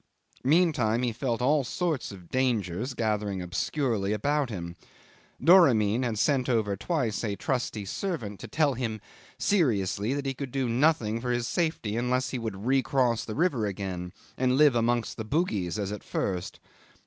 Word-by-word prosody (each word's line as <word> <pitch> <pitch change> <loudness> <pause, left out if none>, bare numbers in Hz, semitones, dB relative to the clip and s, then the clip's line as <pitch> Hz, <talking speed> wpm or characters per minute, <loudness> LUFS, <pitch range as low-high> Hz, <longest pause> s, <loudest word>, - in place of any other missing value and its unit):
Meantime 135 -6 +3
he 120 - +1
felt 120 0 -2
all 145 +2 +3
sorts 155 0 -2
of 90 -4 -12
dangers 120 -2 0
gathering 105 -4 -1
obscurely 100 - -1
about 140 +5 0
him. 85 -5 -6 0.6
Doramin 125 - +5
had 120 -4 -1
sent 130 +2 +2
over 110 -5 +1
twice 125 - -1
a 105 -3 -1
trusty 110 -1 -2
servant 110 - -4
to - - -8
tell 150 -3 +2
him 115 -3 -3 0.4
seriously 110 - +1
that 140 -1 -3
he 135 - -1
could 135 0 -5
do 130 0 -1
nothing 115 -3 +2
for 125 - -3
his 120 -1 0
safety 160 - -1
unless 125 +1 0
he 130 - -2
would 110 -3 -5
recross 130 -3 +2
the 110 -2 -6
river 140 -10 +1
again 90 -3 -4 0.3
and 130 0 +2
live 150 -2 +6
amongst 120 0 0
the 110 - -3
Bugis 110 - -1
as 100 -1 -2
at 105 - -6
first. 90 -2 -3
120 Hz, 160 wpm, -28 LUFS, 105-135 Hz, 0.6 s, live